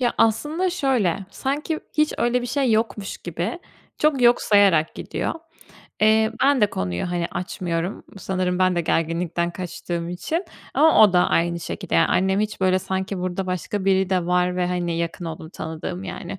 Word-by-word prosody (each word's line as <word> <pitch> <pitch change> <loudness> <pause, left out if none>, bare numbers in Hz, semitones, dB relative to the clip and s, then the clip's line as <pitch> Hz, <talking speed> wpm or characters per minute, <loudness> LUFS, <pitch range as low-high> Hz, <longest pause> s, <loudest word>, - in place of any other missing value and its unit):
Ya, 240 -2 +1
aslında 300 - +2
şöyle, 235 - 0
sanki 290 - -2 0.2
hiç 305 0 +3
öyle 240 +1 +1
bir 245 - -3
şey 260 -2 +1
yokmuş 215 -2 -1
gibi 175 - -4 0.4
çok 295 -4 +2
yok 240 0 +5
sayarak 195 -7 +4
gidiyor. - - -3 0.7
Eee, 220 +1 +4
ben 275 -2 +4
de 210 - +3
konuyu, 90 - -3
hani, 175 -1 -1
açmıyorum, 175 0 -3
sanırım 185 -1 -1
ben 185 -1 +3
de - - +2
gerginlikten 170 +1 0
kaçtığım 170 -1 -5
için 315 - -3 0.3
ama 315 -6 +6
o 205 -3 +6
da 180 - +4
aynı 170 0 +1
şekilde. - - -5
Ya, - - +5
annem 190 +2 +2
hiç 215 -1 -3
böyle 185 0 +3
sanki 190 +1 -3
burada 185 +1 -3
başka 185 +2 -3
biri 190 -1 +2
de 180 -2 +1
var 180 0 +1
ve, 180 -1 +1
hani, 175 -2 -1
yakın 170 +2 -3
olduğum, 160 -1 -7
tanıdığım, 165 +3 -6
yani, 195 - -6
185 Hz, 170 wpm, -23 LUFS, 175-220 Hz, 0.7 s, ama